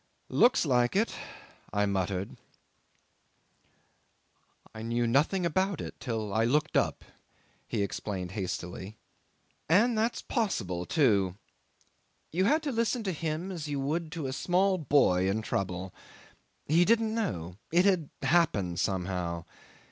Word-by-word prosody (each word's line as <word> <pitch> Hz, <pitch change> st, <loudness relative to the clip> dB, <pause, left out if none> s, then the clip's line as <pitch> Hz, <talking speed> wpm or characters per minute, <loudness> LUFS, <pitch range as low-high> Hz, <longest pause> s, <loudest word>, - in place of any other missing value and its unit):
'"Looks 245 Hz, -6 st, +4 dB
like 125 Hz, -1 st, +2 dB
it," 220 Hz, +4 st, +2 dB, 0.6 s
I 105 Hz, 0 st, +1 dB
muttered. 95 Hz, -1 st, -2 dB, 2.4 s
'"I 110 Hz, -, -8 dB
knew 120 Hz, +1 st, 0 dB
nothing 150 Hz, +10 st, +2 dB
about 185 Hz, +2 st, 0 dB
it -, -, -5 dB
till 110 Hz, -4 st, -3 dB
I 110 Hz, -, +2 dB
looked 150 Hz, +6 st, +1 dB
up," -, -, +1 dB, 0.6 s
he 100 Hz, -, -1 dB
explained 95 Hz, -2 st, -4 dB
hastily. 95 Hz, +1 st, -5 dB, 0.7 s
And 225 Hz, +8 st, +4 dB
that's 225 Hz, +2 st, 0 dB
possible, 95 Hz, -, -1 dB
too. 100 Hz, -, +2 dB, 1.0 s
You 185 Hz, +4 st, +1 dB
had 310 Hz, +8 st, +3 dB
to 290 Hz, -, -1 dB
listen 230 Hz, 0 st, 0 dB
to 195 Hz, -, -1 dB
him 165 Hz, +3 st, -3 dB
as 165 Hz, -5 st, -5 dB
you 145 Hz, -1 st, -2 dB
would 155 Hz, +4 st, -2 dB
to 165 Hz, -5 st, -4 dB
a 130 Hz, -, -2 dB
small 185 Hz, +5 st, +2 dB
boy 95 Hz, -, +3 dB
in 110 Hz, +3 st, -1 dB
trouble. 95 Hz, -2 st, -3 dB, 0.7 s
He 165 Hz, +4 st, +4 dB
didn't 225 Hz, +2 st, +2 dB
know. 90 Hz, -, -3 dB
It 175 Hz, +3 st, +4 dB
had 185 Hz, -7 st, +2 dB
happened 130 Hz, -, +2 dB
somehow. 90 Hz, -3 st, -2 dB
135 Hz, 130 wpm, -29 LUFS, -, 2.4 s, Looks